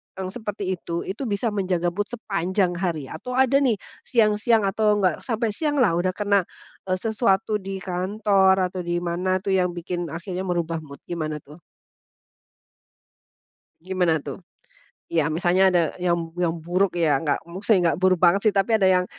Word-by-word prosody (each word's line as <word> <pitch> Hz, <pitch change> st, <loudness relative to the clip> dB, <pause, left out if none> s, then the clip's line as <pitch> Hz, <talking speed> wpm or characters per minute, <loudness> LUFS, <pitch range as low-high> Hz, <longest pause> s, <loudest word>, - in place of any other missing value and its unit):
yang 190 Hz, -1 st, -5 dB
seperti 205 Hz, -4 st, -4 dB
itu, 170 Hz, -1 st, -4 dB
itu 215 Hz, +8 st, -5 dB
bisa 210 Hz, +2 st, -1 dB
menjaga 180 Hz, -4 st, 0 dB
mood 205 Hz, +3 st, -2 dB
sepanjang 195 Hz, -5 st, -1 dB
hari? 165 Hz, -7 st, -3 dB
Atau 250 Hz, 0 st, -6 dB
ada 265 Hz, +1 st, +4 dB
nih 255 Hz, -5 st, +2 dB, 0.3 s
siang-siang 220 Hz, -1 st, +3 dB
atau, 210 Hz, +2 st, +2 dB
nggak 180 Hz, -4 st, +2 dB
sampai 225 Hz, -1 st, 0 dB
sianglah 290 Hz, -, +1 dB
udah 185 Hz, 0 st, -1 dB
kena, 200 Hz, -3 st, +1 dB, 0.4 s
eee, 185 Hz, -, +1 dB
sesuatu 210 Hz, 0 st, 0 dB
di 195 Hz, 0 st, -6 dB
kantor 190 Hz, +1 st, +2 dB, 0.2 s
atau 185 Hz, -, -5 dB
di 175 Hz, 0 st, -2 dB
mana 180 Hz, +2 st, 0 dB
tuh 200 Hz, -, -1 dB
yang 180 Hz, -1 st, 0 dB
bikin 175 Hz, 0 st, -4 dB
akhirnya 180 Hz, +3 st, -5 dB
merubah 170 Hz, -2 st, -1 dB
mood. 140 Hz, -3 st, -12 dB
Gimana 155 Hz, -3 st, -2 dB
tuh? 150 Hz, +4 st, -14 dB, 2.2 s
Gimana 180 Hz, -4 st, 0 dB
tuh? -, -, -7 dB, 0.7 s
Ya, 160 Hz, -3 st, +2 dB
misalnya 180 Hz, +4 st, +3 dB
ada 175 Hz, -2 st, +3 dB, 0.2 s
yang 170 Hz, -2 st, -1 dB
yang 170 Hz, -2 st, +1 dB
buruk 180 Hz, +2 st, 0 dB
ya, 160 Hz, -5 st, +3 dB
nggak, 150 Hz, 0 st, -1 dB
maksudnya 195 Hz, +3 st, +2 dB
nggak -, -, -5 dB
buruk 185 Hz, -1 st, +4 dB
banget 180 Hz, +3 st, +5 dB
sih -, -, -4 dB
tapi 195 Hz, +4 st, +2 dB
ada 190 Hz, -, +4 dB
yang, 180 Hz, -1 st, +3 dB
185 Hz, 165 wpm, -24 LUFS, 175-205 Hz, 2.2 s, banget